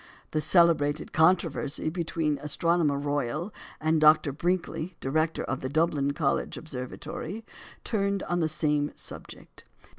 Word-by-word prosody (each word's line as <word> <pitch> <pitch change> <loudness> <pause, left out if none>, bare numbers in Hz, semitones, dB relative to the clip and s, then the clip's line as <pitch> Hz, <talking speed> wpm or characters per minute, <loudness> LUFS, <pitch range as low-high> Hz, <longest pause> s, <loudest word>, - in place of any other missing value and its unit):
The 155 - +1
celebrated 155 -3 +3
controversy 160 -3 +2
between 165 -2 -1
the 140 - -11
Astronomer 160 -1 +1
Royal 145 - -2 0.3
and 155 0 +2
Dr. 155 -1 +6
Brinkley, 175 +2 -2
Director 155 +4 0
of 130 - -3
the 130 - -3
Dublin 145 -2 +1
College 140 -2 0
Observatory, 155 - -6 0.4
turned 200 -3 0
on 175 0 -1
the 160 - +2
same 150 -2 0
subject. - - -11
155 Hz, 125 wpm, -28 LUFS, 145-170 Hz, 0.4 s, Dr